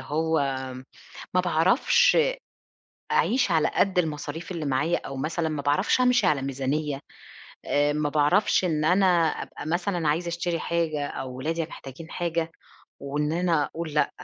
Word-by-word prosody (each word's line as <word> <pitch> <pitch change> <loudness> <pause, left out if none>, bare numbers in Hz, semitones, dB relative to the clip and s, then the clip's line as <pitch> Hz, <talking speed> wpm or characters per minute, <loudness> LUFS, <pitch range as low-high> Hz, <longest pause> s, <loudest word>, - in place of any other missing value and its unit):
هو 160 +2 0 1.0
ما 185 - +5
باعرفش 235 - +3
أ - - +2 0.8
أعيش 245 -4 +2
على 160 -2 +3
قد 195 -2 +2
المصاريف 160 +1 -3
اللي 165 -4 -4
معايا 145 +6 +1
أو 135 - -6
مثلًا 160 +4 -1
ما 150 -2 -3
باعرفش 145 - +2
أمشي 250 -5 +4
على 145 -6 +2
ميزانية 140 +2 -2 0.6
آآ، 145 0 +2
ما 150 0 0
باعرفش 155 +8 +3
إن 155 -4 0
أنا 185 +4 +4 0.2
أبقى - - -6
مثلًا 175 0 -1
عايزة 170 +4 0
أشتري 170 0 -2
حاجة 160 -4 -1
أو 130 -2 -6
ولادي 165 +5 -2
محتاجين 155 +1 -10
حاجة، 165 -1 -2 0.5
وإن 150 +2 -1
أنا 170 -3 +1
أقول 160 -1 -6
لأ، 150 - +2
160 Hz, 150 wpm, -26 LUFS, 145-175 Hz, 1.0 s, ما